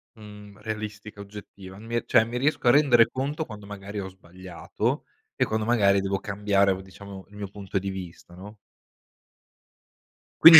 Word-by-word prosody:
mhmm, 105 Hz, -2 st, -12 dB
realistica, 105 Hz, -1 st, -6 dB
oggettiva, 100 Hz, -1 st, -10 dB
mi 115 Hz, +2 st, -1 dB
cioè 110 Hz, -, +5 dB
mi 115 Hz, +2 st, -4 dB
riesco 140 Hz, 0 st, +1 dB
a 120 Hz, -, +9 dB
rendere 120 Hz, -5 st, +6 dB
conto 145 Hz, +4 st, -2 dB
quando 105 Hz, -5 st, -10 dB
magari 100 Hz, 0 st, -6 dB
ho 95 Hz, -1 st, -4 dB
sbagliato 95 Hz, -1 st, -4 dB, 0.3 s
e -, -, +2 dB
quando 110 Hz, 0 st, -1 dB
magari 100 Hz, -4 st, +4 dB
devo 95 Hz, 0 st, -1 dB
cambiare 100 Hz, -1 st, +2 dB
o 95 Hz, -, -2 dB
diciamo 95 Hz, 0 st, -11 dB
il 105 Hz, -, -16 dB
mio 105 Hz, -1 st, -5 dB
punto 100 Hz, -1 st, -3 dB
di 95 Hz, +1 st, -3 dB
vista, 90 Hz, -2 st, -8 dB
no? 100 Hz, +4 st, -10 dB, 1.9 s
Quindi 165 Hz, -1 st, +13 dB
105 Hz, 160 wpm, -26 LUFS, 95-110 Hz, 1.9 s, Quindi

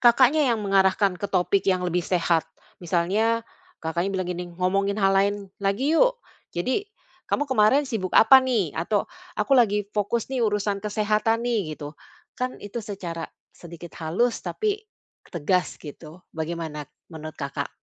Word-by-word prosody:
Kakaknya 260 Hz, +4 st, +5 dB
yang 225 Hz, -3 st, 0 dB
mengarahkan 195 Hz, 0 st, +3 dB
ke 200 Hz, -, -2 dB
topik 190 Hz, +1 st, +2 dB
yang 185 Hz, -1 st, +2 dB
lebih 180 Hz, 0 st, 0 dB
sehat. 170 Hz, -2 st, +1 dB, 0.3 s
Misalnya 200 Hz, +7 st, +1 dB, 0.4 s
Kakaknya 170 Hz, +3 st, -1 dB
bilang 185 Hz, -1 st, -2 dB
gini, 180 Hz, 0 st, -5 dB
"Ngomongin 190 Hz, +3 st, 0 dB
hal 195 Hz, -2 st, +3 dB
lain 200 Hz, +1 st, +3 dB, 0.3 s
lagi 200 Hz, +10 st, +1 dB
yuk. -, -, +4 dB, 0.4 s
Jadi, 260 Hz, -, -1 dB, 0.4 s
kamu 290 Hz, -, +1 dB
kemarin 260 Hz, +1 st, +3 dB
sibuk 220 Hz, -9 st, -3 dB
apa 265 Hz, +4 st, +8 dB
nih?" 230 Hz, -, 0 dB
Atau 200 Hz, +5 st, 0 dB, 0.3 s
"aku -, -, 0 dB
lagi 210 Hz, -5 st, +4 dB
fokus 220 Hz, +4 st, -1 dB
nih 260 Hz, -, 0 dB
urusan 210 Hz, -2 st, 0 dB
kesehatan 215 Hz, +2 st, 0 dB
nih," 205 Hz, -11 st, -1 dB
gitu. 145 Hz, -1 st, -7 dB, 0.4 s
Kan 255 Hz, 0 st, -3 dB
itu 205 Hz, +4 st, -5 dB
secara 185 Hz, -6 st, -6 dB, 0.2 s
sedikit 170 Hz, 0 st, -11 dB
halus 190 Hz, +10 st, 0 dB
tapi 420 Hz, -1 st, -2 dB, 0.5 s
tegas 180 Hz, +2 st, 0 dB
gitu. 155 Hz, +3 st, -11 dB
Bagaimana 160 Hz, -2 st, -5 dB, 0.2 s
menurut, 155 Hz, 0 st, -8 dB
Kakak? 140 Hz, 0 st, -4 dB
200 Hz, 145 wpm, -25 LUFS, 175-230 Hz, 0.5 s, apa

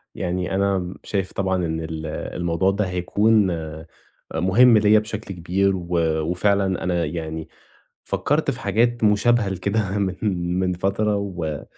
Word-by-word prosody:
يعني 90 Hz, +1 st, -2 dB
أنا 95 Hz, -2 st, 0 dB
شايف 95 Hz, -2 st, -2 dB
طبعًا 95 Hz, -2 st, -1 dB
إن 80 Hz, 0 st, -2 dB
ال 80 Hz, 0 st, -5 dB
الموضوع 85 Hz, +4 st, -1 dB
ده 105 Hz, +1 st, -1 dB
هيكون 100 Hz, +3 st, +2 dB
آآ 80 Hz, -1 st, -6 dB, 0.5 s
مهِم 110 Hz, +8 st, +5 dB
ليَّ 105 Hz, 0 st, +5 dB
بشكل 110 Hz, -2 st, -6 dB
كبير، 95 Hz, +3 st, +1 dB
و 85 Hz, -2 st, -6 dB, 0.3 s
وفعلًا 95 Hz, +3 st, +1 dB
أنا 90 Hz, -2 st, 0 dB
يعني 80 Hz, 0 st, -5 dB, 0.6 s
فكّرت -, -, 0 dB
في -, -, -6 dB
حاجات 120 Hz, +1 st, +1 dB
مشابهة 105 Hz, +1 st, +3 dB
لكده 100 Hz, +2 st, -1 dB
من 95 Hz, -2 st, -1 dB, 0.4 s
من 90 Hz, -1 st, +1 dB
فترة، 100 Hz, +3 st, 0 dB
و 85 Hz, -7 st, -4 dB
95 Hz, 140 wpm, -22 LUFS, 85-105 Hz, 0.6 s, مهِم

